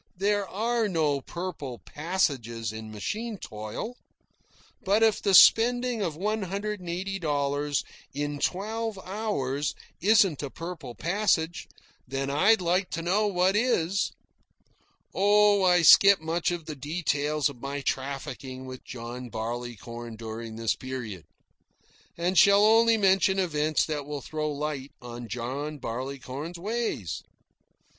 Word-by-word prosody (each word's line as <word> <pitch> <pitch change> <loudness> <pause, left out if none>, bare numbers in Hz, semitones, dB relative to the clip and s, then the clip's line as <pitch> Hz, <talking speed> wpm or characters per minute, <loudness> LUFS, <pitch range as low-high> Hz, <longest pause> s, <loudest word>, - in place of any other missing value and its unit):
There 200 +1 +1
are 225 +1 0
no 150 -6 +1
purple 160 -7 -6
passages 130 - -2
in 110 0 -8
machine 210 - -4
toil. 110 - -6 0.9
But 205 +3 +3
if 220 -2 +3
the 195 -2 +3
spending 245 +2 +6
of 165 -6 -2
one 210 +6 -1
hundred 200 +2 -3
and 180 -2 -8
eighty 190 +3 -3
dollars 145 -2 0 0.3
in 145 +1 -3
twelve 220 +5 -2
hours 165 -9 -2 0.3
isn't 195 -5 +4
a 140 - -4
purple 165 -6 -7
passage, 175 -2 0 0.4
then 135 +1 -2
I'd 190 +9 +4
like 180 +2 +1
to 165 - -3
know 200 +5 +2
what 185 0 +2
is. 200 -5 +1 1.0
Oh, 205 0 +4
I 180 -2 +4
skip 200 +5 +8
much 165 +2 -1
of 175 -3 -4
the 155 - -6
details 150 0 0
of 135 -5 -9
my 140 +1 -4
trafficking 130 -1 -4
with 130 0 -9
John 120 0 -7
Barleycorn 120 0 -6
during 110 0 -7
this 115 0 0
period, 120 - -6 0.9
and 175 +2 +2
shall 200 +1 +7
only 225 +1 +5
mention 190 -1 +3
events 155 -4 +1
that 145 -3 -4
will 145 -1 -4
throw 155 +1 -3
light 145 -2 -4
on 120 0 -8
John 135 +6 -4
Barleycorn's 135 +6 -5
ways. 205 - -3
160 Hz, 130 wpm, -27 LUFS, 130-195 Hz, 1.0 s, skip